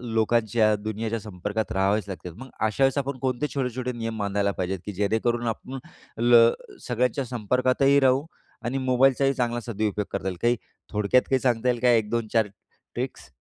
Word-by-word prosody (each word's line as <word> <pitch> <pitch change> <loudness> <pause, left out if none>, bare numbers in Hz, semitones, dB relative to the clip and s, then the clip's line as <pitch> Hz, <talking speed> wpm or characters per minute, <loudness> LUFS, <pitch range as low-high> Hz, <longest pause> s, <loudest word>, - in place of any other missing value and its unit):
लोकांच्या 110 -1 +2
दुनियेच्या 110 +2 -3
संपर्कात 105 +1 -4
राहावेच 100 +2 +1
लागतात. 90 -2 -7
मग 130 0 -10 0.2
अशावेळेस 135 +5 +2
आपण 140 -1 -2
कोणते 130 +2 -1
छोटे-छोटे 125 -2 -2
नियम 115 -2 -4
बांधायला 100 0 0
पाहिजेत, 95 0 -3
की 105 - -4
जेणेकरून 110 +4 0
आपण 130 +4 -5 0.4
ल 120 -1 +7 0.4
सगळ्यांच्या 125 +3 0
संपर्कातही 130 +4 +2
राहू 135 +2 +3 0.4
आणि 130 +3 -1
मोबाईलचाही 135 +1 +3
चांगला 120 -2 -1
सदुपयोग 105 -2 -2
करता 95 - -2
येईल, 90 -2 -5
काही 120 +1 +3 0.4
थोडक्यात 105 +4 +3
काही 130 -1 +3
सांगता 125 -1 +1
येईल 120 -1 +1
का 125 - +4
1-2-4 115 -1 +1
ट्रिक्स? 100 -1 -9
115 Hz, 150 wpm, -25 LUFS, 105-125 Hz, 0.4 s, ल